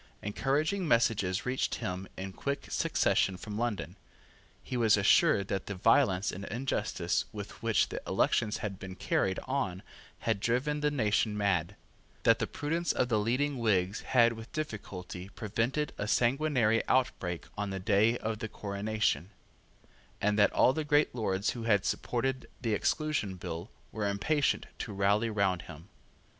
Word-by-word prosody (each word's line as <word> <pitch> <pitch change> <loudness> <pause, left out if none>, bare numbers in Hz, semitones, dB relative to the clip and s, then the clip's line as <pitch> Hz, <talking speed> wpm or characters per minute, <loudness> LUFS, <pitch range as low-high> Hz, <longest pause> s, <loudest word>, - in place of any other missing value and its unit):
Encouraging 150 - 0
messages 110 -7 +2
reached 125 +1 0
him 90 +1 -4
in 95 0 -5
quick 140 +6 -3
succession 95 -1 +2
from 105 +2 -7
London. 115 -6 -2 0.7
He - - -5
was 115 -4 +4
assured 100 -1 +4
that 95 -1 -2
the 100 - -4
violence 100 -1 +3
and 95 - -7
injustice 130 +4 -1
with - - -8
which - - +2
the - - -5
elections 105 -1 +1
had 100 -3 -5
been 95 -1 -7
carried 95 0 0
on 90 +1 -2 0.4
had 110 -3 0
driven 130 +8 0
the 150 0 +2
nation 110 -5 +1
mad, 100 -2 0 0.5
that - - +5
the - - -1
prudence 165 +4 -1
of 125 - 0
the 110 -3 +2
leading 130 +5 0
Whigs 100 -3 +1
had 120 -3 +4
with 115 0 -10
difficulty 100 -9 -6
prevented 115 +9 -2
a 100 - -2
sanguinary 120 -2 +2
outbreak 95 -9 0
on 105 0 -2
the 95 0 -3
day 110 +4 +3
of 110 -1 -3
the 110 -2 -4
coronation, 100 -5 -1 0.9
and 105 +1 +2
that 100 - +5
all 130 - +4
the 155 - -2
great 150 0 +3
Lords 100 -4 0
who 115 -2 -6
had 105 -3 +3
supported 130 +1 -1
the 115 -3 -1
Exclusion 130 -4 0
Bill 85 +2 -6 0.2
were 105 -2 -2
impatient 145 +9 +1
to 105 - -5
rally 100 +3 +2
round 100 -4 +1
him. 80 +3 -12
110 Hz, 155 wpm, -31 LUFS, 100-125 Hz, 0.9 s, that